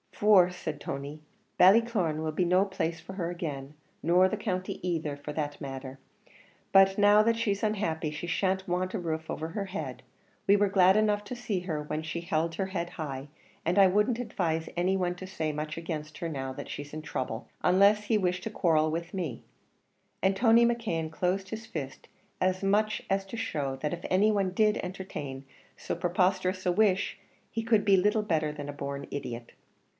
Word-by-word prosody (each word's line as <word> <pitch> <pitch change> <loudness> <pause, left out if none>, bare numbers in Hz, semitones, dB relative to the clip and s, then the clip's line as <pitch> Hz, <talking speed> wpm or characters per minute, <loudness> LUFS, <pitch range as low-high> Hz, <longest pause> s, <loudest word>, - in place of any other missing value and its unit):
"For," 195 -4 +5
said 155 -4 -5
Tony, 140 +2 -6 0.4
"Ballycloran 190 -6 +4
will 155 - -1
be 175 +4 0
no 185 +3 +4
place 170 -4 -2
for 190 - -9
her 175 -3 -3
again, 150 -6 -5 0.3
nor 180 +3 +5
the 215 - -2
county 185 -3 -3
either 155 -4 -2
for 145 +1 -7
the 145 -1 -2
matter 135 -1 -6
of 130 - -11
that; - - -25 0.7
but 195 0 +6
now 205 +1 +6
that 230 +1 +2
she's 205 -3 -1
unhappy 170 -8 -1
she 155 +3 -5
shan't 190 +2 0
want 185 +1 -1
a - - -1
roof 160 -2 -3
over 160 +1 -4
her 200 +4 -3
head; 195 +1 -6 0.4
we 200 - +7
were 205 0 +3
glad 190 -1 +5
enough 210 -1 +2
to 250 - -5
see 220 -6 -2
her 160 -5 -3
when 150 +1 -4
she 160 +1 -4
held 165 0 -1
her 190 +2 -1
head 175 -2 -3
high, 145 -4 -5 0.4
and 175 +4 +2
I 195 - +8
wouldn't 210 +6 +2
advise 170 -9 -2
any 180 +2 +1
one 180 -1 -1
to 185 +1 -8
say 160 -5 -2
much 150 +1 -4
against 155 -2 -5
her 170 -2 -3
now 135 -3 -4
she's 145 0 -7
in 155 - -5
throuble 125 -6 -4 0.2
unless 200 +3 +5
he 220 +1 +2
wished 180 -2 0
to 220 - -4
quarrel 155 -6 +2
with 170 +3 -4
me." 160 -11 -4 0.8
And 190 0 +3
Tony 230 +2 +5
McKeon 215 -10 -1
closed 185 +3 -1
his 220 +1 -6
fist 140 -10 -6 0.3
as 185 +1 +1
much 210 +2 +2
as 195 0 +1
to 215 +4 -7
show 140 -11 -2
that 150 +3 -2
if 175 - -6
any 200 +4 +4
one 195 -3 +1
did 210 +2 +3
entertain 150 -8 -6 0.3
so - - -3
preposterous 185 +1 0
a - - +4
wish 200 0 +2 0.3
he 225 - -2
could 220 -2 +3
be 200 -1 +6
little 210 +3 +2
better 155 -6 0
than 145 -1 -7
a - - -4
born 140 0 -5
idiot. 120 -4 -6
180 Hz, 195 wpm, -29 LUFS, 155-200 Hz, 0.8 s, I